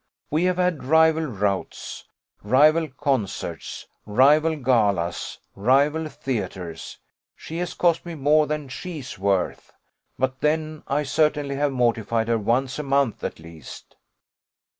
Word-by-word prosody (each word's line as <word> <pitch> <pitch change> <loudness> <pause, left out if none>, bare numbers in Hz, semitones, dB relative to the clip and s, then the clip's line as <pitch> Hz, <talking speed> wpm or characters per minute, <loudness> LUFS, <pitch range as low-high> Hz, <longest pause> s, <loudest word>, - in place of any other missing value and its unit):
We 160 +4 +2
have 180 -1 +1
had 180 -4 0
rival 160 +2 +4
routs, 100 -5 -3 0.4
rival 150 +9 +4
concerts, 135 -6 -3 0.2
rival 150 +8 +4
galas, 105 - 0 0.2
rival 140 +9 +2
theatres: 95 - -5 0.4
she 165 - -8
has 180 - -3
cost 170 -2 +2
me 170 -1 -7
more 150 +1 +3
than 150 -1 -3
she's 140 - -7
worth; 95 -1 -1 0.5
but 130 0 -1
then 155 0 0
I 145 +2 0
certainly 145 0 +1
have 145 0 +1
mortified 115 -2 0
her 115 -1 +2
once 125 +6 0
a - - -2
month 140 -4 +1
at - - -3
least. 80 -3 -12
140 Hz, 125 wpm, -24 LUFS, 115-155 Hz, 0.5 s, rival